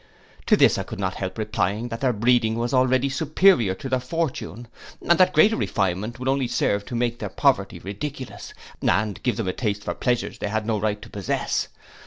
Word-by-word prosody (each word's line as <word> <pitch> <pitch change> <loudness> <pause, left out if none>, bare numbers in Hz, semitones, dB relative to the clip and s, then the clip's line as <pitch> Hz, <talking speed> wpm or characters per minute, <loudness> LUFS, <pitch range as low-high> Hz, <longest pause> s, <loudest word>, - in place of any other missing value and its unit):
To - - +5
this - - +4
I - - -2
could - - -8
not - - -1
help - - -5
replying, 105 +6 -1
that 115 -1 -6
their 130 -2 +3
breeding 115 0 +2
was 120 +2 -2
already 130 +1 +3
superior 140 - +3
to 135 - -7
their 130 -1 0
fortune; 125 -4 -4 0.4
and 170 +1 +4
that 185 0 +5
greater 205 +8 +5
refinement 100 - -1
would 130 +1 -5
only 135 -1 +1
serve 100 -3 0
to 120 - -6
make 120 0 -1
their 105 - -4
poverty - - +1
ridiculous, 130 +7 -7 0.3
and 105 +1 0
give 125 -4 0
them 110 - -2
a 95 - -1
taste 105 -4 -2
for - - -2
pleasures 125 -2 -1
they - - -2
had 110 0 -1
no 110 -1 0
right 105 0 -1
to 115 - -12
possess. 100 -2 -1
120 Hz, 205 wpm, -24 LUFS, 105-130 Hz, 0.4 s, To